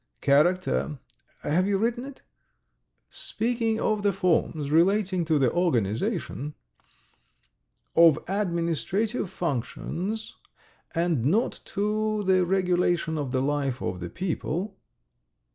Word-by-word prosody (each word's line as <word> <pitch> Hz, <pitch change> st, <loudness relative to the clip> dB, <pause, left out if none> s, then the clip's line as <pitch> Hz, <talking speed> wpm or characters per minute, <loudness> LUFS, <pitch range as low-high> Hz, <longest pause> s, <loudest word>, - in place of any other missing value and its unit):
"Character... 140 Hz, -, +2 dB, 0.5 s
have 180 Hz, +6 st, +1 dB
you 200 Hz, -1 st, +2 dB
written 235 Hz, +4 st, -1 dB
it? 280 Hz, -1 st, -11 dB, 0.9 s
Speaking 225 Hz, -1 st, -1 dB
of 215 Hz, -1 st, +1 dB
the 200 Hz, 0 st, +3 dB
forms 165 Hz, -5 st, 0 dB
relating 185 Hz, +2 st, +3 dB
to 155 Hz, -1 st, +2 dB
the 130 Hz, -4 st, +3 dB
organization... 150 Hz, -, -1 dB, 1.4 s
of 165 Hz, -3 st, +7 dB
administrative 185 Hz, -, -1 dB
functions, 180 Hz, -, -3 dB, 0.6 s
and 165 Hz, -7 st, +1 dB
not 200 Hz, -, +1 dB
to 215 Hz, +1 st, -1 dB
the 185 Hz, -2 st, +3 dB
regulation 180 Hz, -3 st, +1 dB
of 145 Hz, -4 st, -2 dB
the 130 Hz, -1 st, +1 dB
life 140 Hz, -2 st, -1 dB
of 90 Hz, -6 st, -3 dB
the 85 Hz, -1 st, -5 dB
people 185 Hz, -, -3 dB
175 Hz, 105 wpm, -26 LUFS, 150-205 Hz, 1.4 s, of